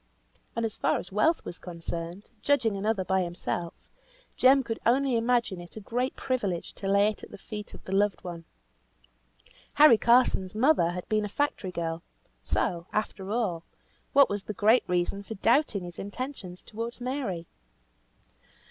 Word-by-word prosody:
And, 230 0 0
as 220 - -3
far - - +1
as 180 - -7
wealth 265 - +2
was 175 - -7
concerned, 170 +2 -6
judging 240 -7 +2
another 200 -1 0
by 190 +1 +2
himself, 175 -1 -3 0.6
Jem 265 +1 +5
could 225 -2 -4
only 260 +2 +3
imagine 230 -5 +1
it 175 - -13
a - - -6
great 245 +5 -2
privilege 205 -10 -2
to 195 - -6
lay 200 +1 +4
it 215 - -7
at - - -9
the - - -10
feet 210 +1 -8
of - - -14
the - - -8
loved 200 0 +1
one. 170 -2 -7 1.3
Harry 290 -7 +8
Carson's 235 -6 +3
mother 245 - +4
had 180 +1 -5
been 215 -1 +1
a 210 - -3
factory 250 -7 -1
girl; 165 -1 -3 0.4
so, 170 0 -1
after 205 -2 -3
all, 205 -7 -1 0.5
what 280 0 +7
was 205 0 -2
the 210 - -6
great 220 +3 +4
reason 180 +2 0
for 220 +2 -7
doubting 225 -1 +2
his 175 -1 -8
intentions 205 -3 -6
towards 230 +3 -6
Mary? 245 -10 -3
210 Hz, 165 wpm, -28 LUFS, 180-240 Hz, 1.3 s, Harry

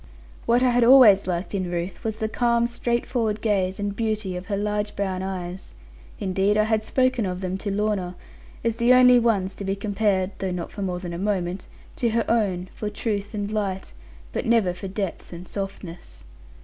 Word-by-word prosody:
What 240 +2 +4
I 250 - +4
had 245 0 +3
always 230 -7 +7
liked 180 +2 -2
in 185 -3 -1
Ruth, 175 +1 -4
was 220 -1 -2
the 220 -1 -1
calm, 235 +1 +2
straightforward 235 -2 -1
gaze, 195 -3 0
and 205 0 -2
beauty 215 -4 -2
of 180 +1 -6
her 200 - -1
large 210 0 -2
brown 190 -2 -2
eyes. 185 -1 -6 0.4
Indeed 195 +2 +1
I 215 - +4
had 220 0 +1
spoken 255 -1 +1
of 180 0 -4
them 185 0 -2
to 205 - -3
Lorna, 200 -3 -1 0.5
as 230 -1 0
the 240 +1 +5
only 250 -1 +7
ones 205 -5 +1
to - - -8
be 195 0 -1
compared 200 -2 0
(though 190 - -1
not 180 -1 -4
for 205 - -7
more 185 -2 -2
than 175 -1 -6
a 170 - -5
moment) 185 -2 -2 0.3
to 235 - +1
her 230 +1 0
own, 195 -6 +1
for 210 - -4
truth 210 -1 -3
and 205 0 -3
light, 195 -3 -3 0.4
but - - -2
never 225 -6 +3
for 180 +2 -7
depth 195 -1 -4
and 175 +1 -9
softness. 195 -3 -7
205 Hz, 195 wpm, -24 LUFS, 185-220 Hz, 0.5 s, always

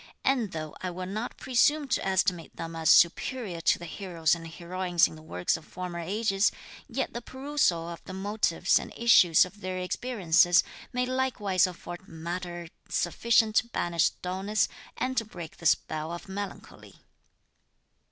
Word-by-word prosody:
And 245 -7 +2
though 155 -1 -6
I 185 - -2
will 180 +1 -5
not 215 +6 -4
presume 285 +4 +2
to 235 - +1
estimate 185 -3 0
them 165 0 -6
as 160 -1 0
superior 180 +1 +3
to - - +3
the 175 - -8
heroes 170 -2 0
and 165 -1 -4
heroines 175 +1 +1
in - - -11
the 155 - -12
works 90 - -1
of - - -13
former 180 0 -6
ages, 195 +3 +1 0.4
yet 265 0 -3
the 235 - -4
perusal 260 - 0
of 170 -1 -8
the 185 - -8
motives 190 -2 +1
and - - -8
issues 185 -9 +6
of 195 +3 -14
their 185 -1 -3
experiences, 180 -3 +3 0.3
may 250 0 0
likewise 235 -8 +1
afford 175 +1 -9
matter 175 +1 -6 0.2
sufficient 220 +4 +2
to 235 - +3
banish 170 -7 +1
dulness, 190 +4 0 0.3
and 255 +1 -2
to 230 - +3
break 175 -7 -9
the 170 - 0
spell 155 +2 0
of 170 +3 -7
melancholy. 200 +1 -7
185 Hz, 160 wpm, -28 LUFS, 170-220 Hz, 0.4 s, issues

